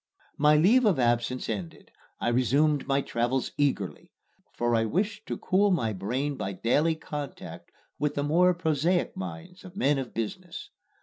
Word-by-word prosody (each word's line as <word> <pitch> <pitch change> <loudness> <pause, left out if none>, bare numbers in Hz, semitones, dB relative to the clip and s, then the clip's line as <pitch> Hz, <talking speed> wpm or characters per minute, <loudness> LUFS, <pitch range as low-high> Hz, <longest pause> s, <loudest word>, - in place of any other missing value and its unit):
My 150 +1 +5
leave 220 +11 +5
of 205 - +3
absence 120 0 0
ended, 95 -7 -6 0.3
I - - 0
resumed 135 +5 +2
my 140 0 +2
travels 120 +1 -1
eagerly; 135 -10 -1 0.4
for 120 0 -1
I 115 -1 +3
wished 200 - -2
to - - -3
cool 200 +2 +2
my 120 - 0
brain 130 +9 -2
by 100 -3 -3
daily 145 - +1
contact 150 -3 -7 0.3
with 150 -1 -1
the 145 - -1
more 175 +5 +3
prosaic 170 +1 0
minds 90 - -8
of 185 -1 -12
men 145 -7 +2
of 130 -3 -5
business. 165 - -6
140 Hz, 160 wpm, -27 LUFS, 120-170 Hz, 0.4 s, My